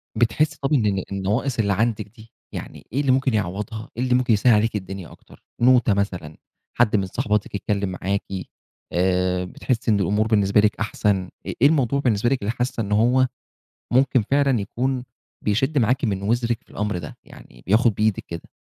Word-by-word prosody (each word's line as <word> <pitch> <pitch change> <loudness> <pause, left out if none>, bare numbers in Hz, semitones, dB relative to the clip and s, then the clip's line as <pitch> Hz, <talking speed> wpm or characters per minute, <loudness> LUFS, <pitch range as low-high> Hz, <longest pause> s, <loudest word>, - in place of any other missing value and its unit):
بتحسي 150 +6 +1
طَب 140 +2 0
إن 120 -7 +3
ال 95 -2 0
النواقص 105 +7 -1
اللي 100 -2 +2
عندِك 110 0 0
دي، 110 +1 -17 0.2
يعني - - -8
إيه 140 - +1
اللي 135 -3 +2
ممكن 130 -1 +2
يعوّضها 105 +2 -3
إيه 125 - 0
اللي 125 -1 +2
ممكن 125 -2 +2
يسهّل 115 +3 +4
عليكِ 110 +1 +2
الدنيا 95 -3 -6
أكتر - - -18 0.2
نوتة 125 -4 +5
مثلًا، 90 -6 -3 0.4
حد 110 -3 +4
من 100 -2 +1
صاحباتِك 105 -1 -1
يتكلم 100 -1 -1
معاكِ، 100 +2 -1 0.7
آآ، 90 0 +1
بتحسي 115 +4 -1
إن 100 - +3
الأمور 105 +4 +1
بالنسبة 105 -2 +3
لِك 105 +1 +2
أحسن، 105 -1 +1 0.3
آآ - - -3
إيه 140 - +8
الموضوع 140 -3 +2
بالنسبة 120 -3 +1
لِك 135 -4 0
اللي 100 - -1
حاسة 125 -1 -2
إن 100 -1 -4
هو 125 +5 +4 0.7
ممكن 130 -2 +3
فعلًا 140 -5 +3
يكون 125 +5 -2 0.4
بيشِدّ 135 +8 +1
معاكِ 125 +3 +2
من 100 -3 -1
وزرِك 120 +2 0
في - - -30
الأمر 105 -3 -2
ده، 75 - -8
يعني، - - -16
بياخد 110 +3 +3
بإيدِك 105 0 0
كده؟ 85 0 -8
110 Hz, 185 wpm, -23 LUFS, 100-125 Hz, 0.7 s, إيه